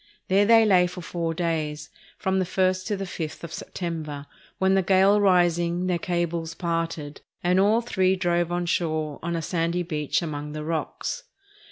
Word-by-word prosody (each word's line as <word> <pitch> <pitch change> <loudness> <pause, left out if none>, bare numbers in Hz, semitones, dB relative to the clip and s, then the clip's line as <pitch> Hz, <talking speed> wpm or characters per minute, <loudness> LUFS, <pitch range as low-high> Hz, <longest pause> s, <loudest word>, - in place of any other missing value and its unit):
There 200 +2 +4
they 225 -1 +7
lay 180 -4 +5
for 180 0 -8
four 165 -1 -3
days, 155 -3 -2 0.3
from 190 0 0
the 185 - +1
first 185 0 0
to 205 - -1
the 195 - -4
fifth 165 -4 -6
of 165 -2 -7
September, 155 -6 -5 0.3
when 190 0 +3
the 195 - +4
gale 195 +2 +4
rising 175 -2 +3
their 180 -2 0
cables 170 -3 -2
parted, 165 -3 -3 0.2
and 180 +1 +3
all 210 +4 +4
three 190 -5 +1
drove 175 -2 0
on 175 0 -1
shore 155 -3 -1
on 170 +1 -2
a 165 - -2
sandy 170 +1 0
beach 155 -2 -1
among 150 -2 -5
the 155 0 -5
rocks. 165 - -3
175 Hz, 175 wpm, -25 LUFS, 165-185 Hz, 0.3 s, they